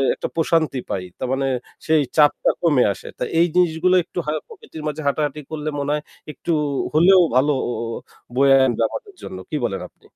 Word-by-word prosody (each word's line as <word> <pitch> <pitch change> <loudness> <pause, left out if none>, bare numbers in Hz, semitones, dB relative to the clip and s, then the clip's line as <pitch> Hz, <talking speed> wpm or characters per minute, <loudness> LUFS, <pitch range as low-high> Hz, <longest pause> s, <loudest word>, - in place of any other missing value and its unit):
একটা - - -4
প্রশান্তি 160 -4 +1
পাই। 95 - -2
তার 130 - -3
মানে 135 0 0 0.4
সেই 160 -1 +4
চাপটা 150 -2 +4
কমে 145 -7 +4
আসে। - - -10
তাই - - -2
এই 170 - +5
জিনিসগুলো 180 0 +3
একটু 175 - -8
হয় 155 +1 -1
প্রকৃতির 375 - -11
মাঝে 150 +1 -4
হাঁটাহাটি 150 +1 0
করলে 155 -1 -4
মনে 140 +1 -2
হয় 150 0 -1 0.3
একটু 170 - -3 0.4
হলেও 180 +5 +6 0.2
ভালো 140 +3 +4 0.8
বয়ে 135 +1 +5
আনবে 120 -2 0
আমাদের 405 -2 -8
জন্য। 95 - -7
কি 150 - -1
বলেন 100 -5 -2
আপনি? - - -35
150 Hz, 175 wpm, -21 LUFS, 135-165 Hz, 0.8 s, হলেও